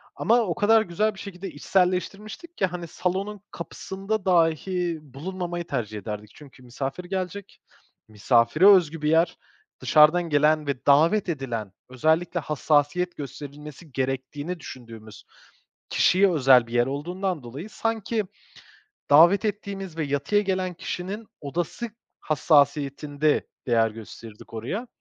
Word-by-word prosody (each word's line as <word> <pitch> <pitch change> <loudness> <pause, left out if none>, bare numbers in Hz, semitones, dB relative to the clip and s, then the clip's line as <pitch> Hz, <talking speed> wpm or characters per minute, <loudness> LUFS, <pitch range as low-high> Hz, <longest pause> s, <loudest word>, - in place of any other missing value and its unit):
Ama 235 +2 +3
o 180 -6 -1
kadar 225 0 +4
güzel 210 +3 -1
bir - - -12
şekilde 195 -1 -7
içselleştirmiştik 195 - -2
ki, 190 - +2
hani, 175 -1 -5
salonun 195 +4 -3
kapısında 195 +4 -5
dahi 175 -1 +1
bulunmamayı 175 +5 -6
tercih 110 -6 -3
ederdik. 105 +1 -7
Çünkü 135 -3 -15
misafir 135 +7 -5
gelecek, 190 +1 -5 0.5
misafire 115 - +3
özgü 165 -6 +5
bir 150 - +1
yer. 165 +2 +3 0.4
Dışarıdan 160 +3 +5
gelen 150 0 +3
ve 135 -2 -3
davet 165 +8 +4
edilen, 120 - -4 0.2
özellikle 160 +7 +1
hassasiyet 150 +3 0
gösterilmesi 145 +2 -9
gerektiğini 135 +6 -3
düşündüğümüz 115 -6 -11 0.7
kişiye 190 +1 +4
özel 130 -6 +5
bir 115 - -10
yer 120 0 +3
olduğundan 175 +3 -3
dolayı, 140 - -8
sanki 225 -1 -2 0.9
davet 170 +9 +6
ettiğimiz 195 -4 -4
ve 160 - -1
yatıya 145 +9 +1
gelen 185 -2 -1
kişinin 195 +6 -5
odası 175 - -4 0.3
hassasiyetinde 145 0 +1 0.2
değer 115 -2 +3
gösterirdik 110 0 -12
oraya. 185 - -4
165 Hz, 120 wpm, -25 LUFS, 140-190 Hz, 0.9 s, davet